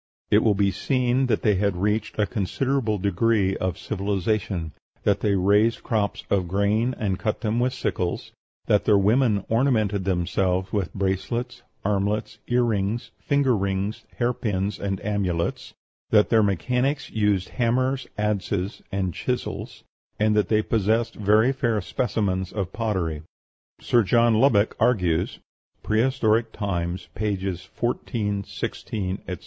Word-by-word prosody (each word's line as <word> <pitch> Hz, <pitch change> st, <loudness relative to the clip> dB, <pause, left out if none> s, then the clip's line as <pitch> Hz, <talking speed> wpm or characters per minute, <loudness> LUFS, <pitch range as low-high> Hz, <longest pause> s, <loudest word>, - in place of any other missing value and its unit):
It 105 Hz, -, +6 dB
will 110 Hz, -3 st, +3 dB
be 100 Hz, 0 st, +2 dB
seen 125 Hz, +5 st, +1 dB
that 110 Hz, -4 st, 0 dB
they 105 Hz, -3 st, +3 dB
had 100 Hz, -1 st, +1 dB
reached 105 Hz, +4 st, -1 dB
a 105 Hz, -, +3 dB
considerable 115 Hz, +3 st, -1 dB
degree 100 Hz, +1 st, +1 dB
of 95 Hz, -1 st, -2 dB
civilization; 100 Hz, -4 st, -2 dB, 0.3 s
that -, -, +2 dB
they 100 Hz, -2 st, +1 dB
raised 105 Hz, +5 st, +3 dB
crops 105 Hz, -3 st, -1 dB
of 95 Hz, -3 st, +2 dB
grain, 105 Hz, +6 st, +1 dB
and 100 Hz, -6 st, -1 dB
cut 110 Hz, -, -2 dB
them 115 Hz, 0 st, 0 dB
with 125 Hz, +1 st, +2 dB
sickles; 90 Hz, -8 st, -3 dB, 0.3 s
that 105 Hz, -1 st, +2 dB
their 105 Hz, -2 st, +5 dB
women 105 Hz, 0 st, +2 dB
ornamented 110 Hz, -5 st, +1 dB
themselves 90 Hz, 0 st, 0 dB
with 100 Hz, -5 st, -1 dB
bracelets, 115 Hz, +6 st, -2 dB, 0.2 s
armlets, 100 Hz, +1 st, -1 dB
earrings, 115 Hz, -2 st, 0 dB
finger 140 Hz, -3 st, +2 dB
rings, 100 Hz, +3 st, -2 dB
hair 120 Hz, +1 st, +1 dB
pins, 100 Hz, -3 st, -2 dB
and 95 Hz, -2 st, -2 dB
amulets; 95 Hz, -5 st, -2 dB, 0.3 s
that 105 Hz, -1 st, +4 dB
their 115 Hz, -1 st, +5 dB
mechanics 125 Hz, -, 0 dB
used 105 Hz, -4 st, +1 dB
hammers, 130 Hz, +2 st, 0 dB
adzes, 100 Hz, -1 st, -1 dB
and 95 Hz, -3 st, -1 dB
chisels; -, -, -4 dB, 0.4 s
and 105 Hz, 0 st, +3 dB
that 105 Hz, -, +2 dB
they 110 Hz, -1 st, +2 dB
possessed 110 Hz, +2 st, +1 dB
very 110 Hz, +4 st, +3 dB
fair 120 Hz, -5 st, 0 dB
specimens 95 Hz, -3 st, -1 dB
of 95 Hz, -3 st, -4 dB
pottery. 95 Hz, -9 st, -1 dB, 0.6 s
Sir 120 Hz, -, +3 dB
John 115 Hz, +3 st, +3 dB
Lubbock 110 Hz, -5 st, +3 dB
argues 90 Hz, -8 st, +1 dB, 0.5 s
("Prehistoric 110 Hz, -1 st, +2 dB
Times," 90 Hz, -3 st, -3 dB
pp. 100 Hz, -4 st, -2 dB
14, 105 Hz, -3 st, -2 dB
16, 95 Hz, -1 st, -4 dB
etc.) 90 Hz, -, -3 dB
105 Hz, 135 wpm, -24 LUFS, 95-115 Hz, 0.6 s, It